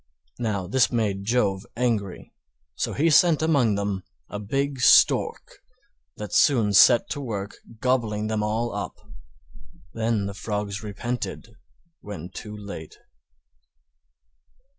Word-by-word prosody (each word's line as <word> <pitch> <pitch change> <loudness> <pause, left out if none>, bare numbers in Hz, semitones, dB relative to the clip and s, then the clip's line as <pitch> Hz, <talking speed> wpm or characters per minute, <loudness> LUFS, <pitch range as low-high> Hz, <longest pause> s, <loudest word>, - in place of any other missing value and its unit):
Now 105 -5 -2
this 130 +6 +2
made 105 -5 -1
Jove 105 -4 +1
angry, 110 -6 -2 0.4
so - - -3
he 160 +3 +2
sent 160 0 +5
among 140 -10 +3
them 100 -1 -2 0.3
a 105 - -5
big 135 +6 -2
Stork 465 - +4 0.6
that 105 -1 -7
soon 115 -8 +3
set 120 +4 +6
to 145 - -3
work 105 -6 -5 0.2
gobbling 115 -5 0
them 110 0 -1
all 110 +2 -1
up. 100 - -4 1.0
Then 110 -2 0
the 100 - -4
Frogs 105 0 -4
repented 115 +3 -5 0.5
when 90 -4 -8
too 105 +2 -8
late. 100 -6 -9
110 Hz, 120 wpm, -25 LUFS, 100-125 Hz, 1.0 s, set